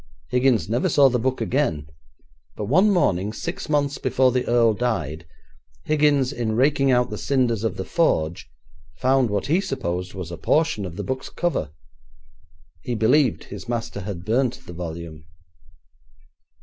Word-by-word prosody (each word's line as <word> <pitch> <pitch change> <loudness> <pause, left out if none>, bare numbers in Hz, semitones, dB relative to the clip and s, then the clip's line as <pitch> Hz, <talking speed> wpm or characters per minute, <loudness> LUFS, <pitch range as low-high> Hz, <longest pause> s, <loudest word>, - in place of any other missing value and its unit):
Higgins 125 -3 +2
never 120 +4 0
saw 140 -2 +5
the 125 -1 0
book 130 +2 -1
again, 125 - 0 0.7
but 105 - -4
one 185 - +4
morning, 105 - +1
six 170 - -5
months 145 -2 0
before 130 0 +2
the 125 0 -1
earl 120 -2 +4
died, 85 - -2 0.6
Higgins, 145 -3 +2
in 115 -4 -2
raking 135 +2 +3
out 125 -1 +2
the - - -5
cinders 125 -6 0
of 115 - -1
the 95 - -4
forge, 85 - 0 0.5
found 130 -1 +2
what 100 -2 -1
he 170 +6 +2
supposed 90 - -4
was 90 -3 -6
a 85 - -6
portion 150 - +1
of 85 - -9
the - - -4
book's 130 0 -4
cover. 175 - -2 1.1
He 120 - -3
believed 125 +3 +2
his 100 +3 -9
master 115 -4 -3
had 90 -3 -6
burnt 120 +3 0
the 85 - -9
volume. 85 -2 -7
120 Hz, 155 wpm, -23 LUFS, 95-135 Hz, 1.1 s, saw